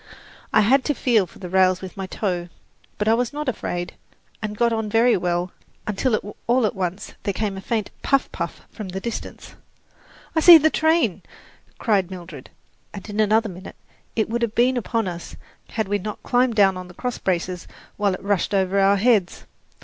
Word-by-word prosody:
I -, -, +5 dB
had 260 Hz, +6 st, +4 dB
to 295 Hz, -, 0 dB
feel 225 Hz, -8 st, +2 dB
for -, -, -17 dB
the 185 Hz, -, -7 dB
rails 185 Hz, 0 st, +3 dB
with 190 Hz, +1 st, -9 dB
my 195 Hz, -1 st, -5 dB
toe; 180 Hz, -4 st, -3 dB, 0.5 s
but 210 Hz, -, -1 dB
I 220 Hz, -, +5 dB
was 240 Hz, 0 st, 0 dB
not 300 Hz, 0 st, -5 dB
afraid, 175 Hz, -7 st, -3 dB, 0.5 s
and 210 Hz, -1 st, -4 dB
got 235 Hz, 0 st, +2 dB
on 220 Hz, -1 st, -2 dB
very 230 Hz, +3 st, +4 dB
well, 175 Hz, 0 st, -1 dB, 0.3 s
until 210 Hz, 0 st, -1 dB
all 245 Hz, 0 st, +3 dB
at 210 Hz, -, 0 dB
once 185 Hz, 0 st, -4 dB
there 200 Hz, -, -2 dB
came 210 Hz, -3 st, -2 dB
a 190 Hz, -, -6 dB
faint 215 Hz, 0 st, -2 dB
"puff, 275 Hz, 0 st, +2 dB
puff" -, -, -5 dB
from 210 Hz, -4 st, -7 dB
the 190 Hz, +1 st, -4 dB
distance. 235 Hz, +3 st, -6 dB, 0.8 s
"I -, -, +4 dB
see 335 Hz, +1 st, +10 dB
the 315 Hz, 0 st, +3 dB
train!" 320 Hz, +2 st, +2 dB, 0.6 s
cried 195 Hz, -5 st, +1 dB
Mildred, 170 Hz, -7 st, -9 dB, 0.5 s
and 200 Hz, -, -8 dB
in 205 Hz, -, -4 dB
another 220 Hz, +1 st, +3 dB
minute 185 Hz, -1 st, -9 dB, 0.4 s
it 220 Hz, -, +1 dB
would 235 Hz, +2 st, -2 dB
have 230 Hz, -2 st, -1 dB
been 250 Hz, +2 st, +3 dB
upon 230 Hz, -3 st, -1 dB
us 175 Hz, -1 st, -6 dB, 0.3 s
had 220 Hz, -3 st, -2 dB
we 205 Hz, +1 st, 0 dB
not 210 Hz, +2 st, -6 dB
climbed 245 Hz, -1 st, +2 dB
down 195 Hz, -3 st, +4 dB
on 185 Hz, 0 st, -7 dB
the 180 Hz, -, -14 dB
crossbraces 185 Hz, -7 st, -2 dB, 0.3 s
while 200 Hz, -2 st, +1 dB
it -, -, -12 dB
rushed 200 Hz, 0 st, 0 dB
over 190 Hz, 0 st, +2 dB
our 195 Hz, +1 st, +4 dB
heads. 205 Hz, -4 st, +2 dB
205 Hz, 190 wpm, -23 LUFS, 185-235 Hz, 0.8 s, see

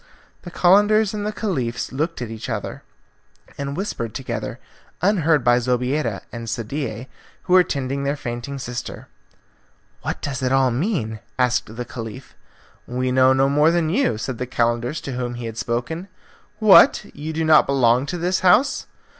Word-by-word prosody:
The 175 Hz, -, -9 dB
Calenders 205 Hz, +4 st, +4 dB
and 210 Hz, 0 st, -3 dB
the -, -, -1 dB
Caliph 135 Hz, -, -3 dB
looked 155 Hz, +1 st, -2 dB
at 115 Hz, -, -6 dB
each 110 Hz, +2 st, -7 dB
other, 110 Hz, -4 st, -4 dB, 0.7 s
and 140 Hz, 0 st, -4 dB
whispered 115 Hz, -, -4 dB
together, 135 Hz, -1 st, -4 dB, 0.4 s
unheard 165 Hz, -, +2 dB
by 120 Hz, 0 st, +4 dB
Zobeida 125 Hz, -1 st, -1 dB
and 115 Hz, -1 st, -6 dB
Sadie, 120 Hz, +1 st, -4 dB, 0.4 s
who 180 Hz, -, 0 dB
were 185 Hz, -1 st, +8 dB
tending 140 Hz, -3 st, -3 dB
their 140 Hz, +1 st, 0 dB
fainting 120 Hz, +2 st, -5 dB
sister. 125 Hz, -2 st, -6 dB, 0.9 s
"What -, -, -3 dB
does 135 Hz, -2 st, -4 dB
it 130 Hz, 0 st, 0 dB
all 135 Hz, -1 st, +3 dB
mean?' 120 Hz, -, -2 dB, 0.2 s
asked 125 Hz, -3 st, 0 dB
the 125 Hz, +1 st, -5 dB
Caliph. 115 Hz, -3 st, -8 dB, 0.5 s
"We 125 Hz, +1 st, -1 dB
know 130 Hz, 0 st, +5 dB
no 135 Hz, +1 st, +3 dB
more 150 Hz, +3 st, +4 dB
than 165 Hz, -2 st, +1 dB
you," 235 Hz, -, +1 dB
said 115 Hz, +2 st, -5 dB
the 125 Hz, -, -3 dB
Calender 120 Hz, +2 st, 0 dB
to 140 Hz, -, -5 dB
whom 125 Hz, -1 st, -3 dB
he 120 Hz, 0 st, -6 dB
had 115 Hz, 0 st, -6 dB
spoken. 155 Hz, +10 st, -3 dB, 0.5 s
"What! 215 Hz, -3 st, +6 dB
You 150 Hz, +2 st, -5 dB
do 160 Hz, 0 st, -1 dB
not 155 Hz, -1 st, +6 dB
belong 130 Hz, -1 st, +3 dB
to 175 Hz, -, -3 dB
the 180 Hz, +2 st, 0 dB
house?" 210 Hz, +10 st, +3 dB
130 Hz, 165 wpm, -22 LUFS, 120-165 Hz, 0.9 s, were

